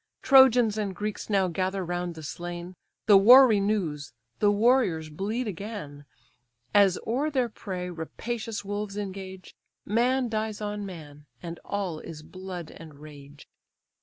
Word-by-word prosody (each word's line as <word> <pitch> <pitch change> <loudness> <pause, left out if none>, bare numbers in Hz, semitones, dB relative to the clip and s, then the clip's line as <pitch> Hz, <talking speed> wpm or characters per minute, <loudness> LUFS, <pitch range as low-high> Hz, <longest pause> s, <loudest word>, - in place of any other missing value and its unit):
Trojans 245 -5 +6
and 200 -3 -3
Greeks 210 +4 -5
now 195 -3 +2
gather 185 +2 -2
round 175 0 -3
the 160 - -9
slain; 175 +3 -7 0.3
The 205 -2 +7
war 250 +7 +9
renews, 200 - 0 0.3
the 205 - +4
warriors 205 -8 +2
bleed 215 +9 -3
again: 190 -7 -7 0.7
As 195 -3 +5
o'er 265 +7 0
their 260 -5 0
prey 185 -4 -6
rapacious 220 +6 -5
wolves 205 0 -4
engage, 190 -2 -7 0.3
Man 245 +4 +1
dies 220 -1 -3
on 205 -1 -4
man, 150 -5 -11 0.2
and 170 0 -7
all 190 -6 -3
is 155 -1 -9
blood 185 -1 -8
and 160 -3 -12
rage. 145 -1 -13
195 Hz, 135 wpm, -27 LUFS, 170-215 Hz, 0.7 s, war